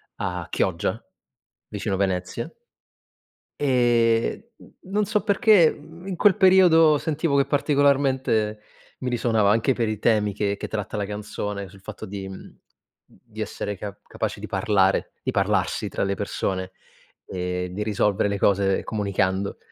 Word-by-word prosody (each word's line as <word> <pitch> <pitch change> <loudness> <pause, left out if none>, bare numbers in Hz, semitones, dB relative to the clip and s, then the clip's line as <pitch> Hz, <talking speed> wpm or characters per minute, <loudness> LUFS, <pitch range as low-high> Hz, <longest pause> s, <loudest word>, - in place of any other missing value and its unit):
a 90 -2 -4
Chioggia - - -1 0.6
vicino 95 - -3
Venezia 90 -2 -2 1.1
e 120 - +2
n - - -17 0.2
non 210 0 +1
so 210 -1 0
perché 205 -5 +5 0.3
in 190 - -4
quel 200 +1 +4
periodo 175 -5 +6
sentivo 150 -1 0
che 140 - +3
particolarmente 135 -7 +1 0.4
mi 130 - -3
risuonava. 110 -4 +2
Anche 115 +5 +2
per 115 -2 -1
i 110 -1 -3
temi 105 -3 +2
che 100 0 -1
che - - -5
tratta 105 0 -4
la 100 - -1
canzone, 105 -1 -5
sul 95 +1 -16
fatto 110 +1 -8
di 95 0 -6
mhmm, 95 - -11 0.5
di - - -12
essere 105 -2 -4
ca 100 0 -6
capaci - - -4
di - - -6
parlare, 95 0 +1
di - - -2
parlarsi - - 0
tra - - -2
le 100 0 0
persone 95 -2 -3 0.6
e 90 0 -3
di 100 +3 -3
risolvere 105 -1 +1
le 100 0 -2
cose 95 -1 +2
comunicando. 100 -2 -1
105 Hz, 145 wpm, -24 LUFS, 100-140 Hz, 1.1 s, periodo